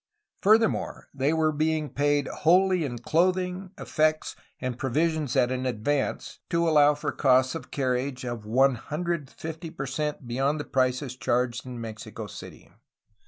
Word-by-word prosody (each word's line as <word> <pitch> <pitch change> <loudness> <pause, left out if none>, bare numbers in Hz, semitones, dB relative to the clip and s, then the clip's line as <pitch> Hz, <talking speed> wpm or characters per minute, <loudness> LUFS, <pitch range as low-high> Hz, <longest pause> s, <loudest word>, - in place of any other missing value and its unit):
Furthermore, 220 +2 +2
they 135 +1 +1
were 160 -1 +2
being 155 0 0
paid 145 0 +1
wholly 180 +2 +3
in 125 -5 -3
clothing, 180 +7 0
effects, 155 0 0 0.2
and 125 -1 -4
provisions 150 +1 0
at 125 - +3
an 130 0 -1
advance, 130 +4 -2
to 170 0 +1
allow 150 -2 +5
for 145 0 -3
costs 130 -2 +3
of 165 - -7
carriage, 130 -1 -1
of 120 -3 -4
150 150 +6 -1
per 150 -4 -5
cent 145 0 -3
be 120 - -5
yond 140 +3 +1
the 145 - -4
prices 130 0 0
charged 125 0 -1
in 125 -1 -6
Mexico 110 -1 -7
City. - - -11
145 Hz, 145 wpm, -27 LUFS, 130-160 Hz, 0.2 s, allow